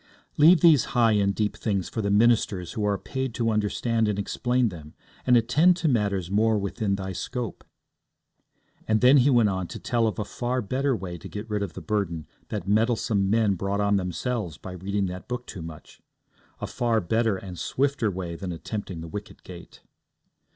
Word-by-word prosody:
'Leave 160 +2 +6
these 155 -7 +6
high 115 -2 +5
and 100 -2 +2
deep 105 -1 -1
things 100 -5 -1
for 110 - -3
the 100 - -1
ministers 105 -4 +2
who 110 - -3
are 100 -1 +1
paid 130 0 -4
to 115 -2 +1
understand 110 +2 0
and 105 -1 -1
explain 120 +4 0
them, 80 -5 -11 0.3
and 125 -1 +6
attend 150 +10 +4
to 170 - 0
matters 100 - 0
more 110 +2 +3
within 100 0 -1
thy 95 -1 -5
scope.' 115 +6 -5 1.2
And 110 0 +3
then 130 +3 +7
he 135 +1 +5
went 120 -5 +4
on 95 -2 -2
to - - -7
tell 115 -2 +1
of 105 - -3
a 105 - -2
far 125 +3 -2
better 130 +5 0
way 90 -5 -6
to - - -9
get 105 +2 -6
rid 105 -2 -2
of 100 -5 -3
the - - -8
burden 95 -8 -2 0.2
that 85 - -4
meddlesome 110 -2 +1
men 110 -1 +3
brought 100 +2 -2
on 100 0 +2
themselves 95 - -3
by 95 - -9
reading 95 +2 -2
that 90 0 -6
book 125 0 -4
too 95 - -8
much 80 -1 -11 0.6
a - - -3
far 120 -3 0
better 110 +2 +1
and 90 -2 -8
swifter 140 -4 0
way 90 -3 -5
than 90 +2 -5
attempting 90 0 -5
the 85 - -7
wicket 105 +5 -8
gate. 90 -2 -12
105 Hz, 195 wpm, -26 LUFS, 95-120 Hz, 1.2 s, then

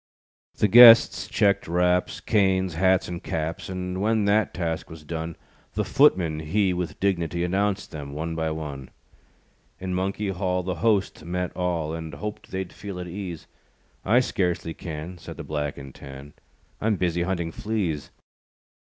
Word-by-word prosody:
The 105 - +3
guests 115 +2 +8
checked 100 -2 +2
wraps, 90 +1 +1
Canes, 95 -4 +2
hats 95 +3 +2
and 85 -1 -5
caps; 80 +2 -4
And 90 0 -4
when 110 0 +2
that 105 0 +2
task 85 -2 -3
was 80 -1 -11
done, 80 +1 -5 0.4
The - - 0
footman 80 -4 +3
he 95 +5 +1
With 90 -1 -4
dignitee, 85 -3 0
Announced 100 +2 -1
them 75 -3 -7
one 80 +3 -4
by 80 0 -1
one. 75 -4 -6 0.9
In 95 0 -4
Monkey 100 +2 -1
Hall, 90 -1 -1
The 95 +1 -2
host 100 -7 +1
met 90 +2 -3
all, 85 -4 -1
And 80 -2 -6
hoped 105 +8 -6
they'd 95 -1 -4
feel 100 -2 -7
at 90 - -5
ease, 90 -2 -6 0.6
"I 120 +6 +4
scarcely 90 -7 -1
can," 80 +2 -7
Said - - -9
the - - -6
Black 75 -2 -3
and 70 -1 -9
Tan, 70 +1 -11 0.5
"I'm 110 0 +2
busy 85 -2 0
hunting 85 -2 -1
fleas." 95 -8 -2
90 Hz, 155 wpm, -25 LUFS, 80-95 Hz, 0.9 s, guests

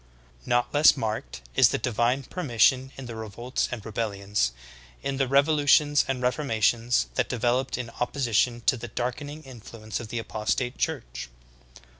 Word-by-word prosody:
20. - - -10
Not 120 0 +1
less 150 0 +6
marked 110 - -4
is - - +6
the - - 0
divine 120 +3 0
permission 130 -3 +2
in 135 - -7
the 120 -2 -7
re 110 0 -6
volts 120 +5 -3
and 120 -4 -6
rebellions, 100 - -1 0.5
in 140 -1 -2
the 135 -1 +1
revolutions 145 +1 +4
and 130 -2 -2
reformations, 120 -2 +1
that 125 - 0
developed 125 +2 0
in 120 -2 -5
opposition 120 -2 +1
to 125 - +2
the 120 +1 -7
darkening 145 +6 -4
influence 115 -4 -8
of 120 - -7
the 120 - -5
apostate 110 +3 -2
church. - - -3
120 Hz, 155 wpm, -26 LUFS, 110-135 Hz, 0.5 s, less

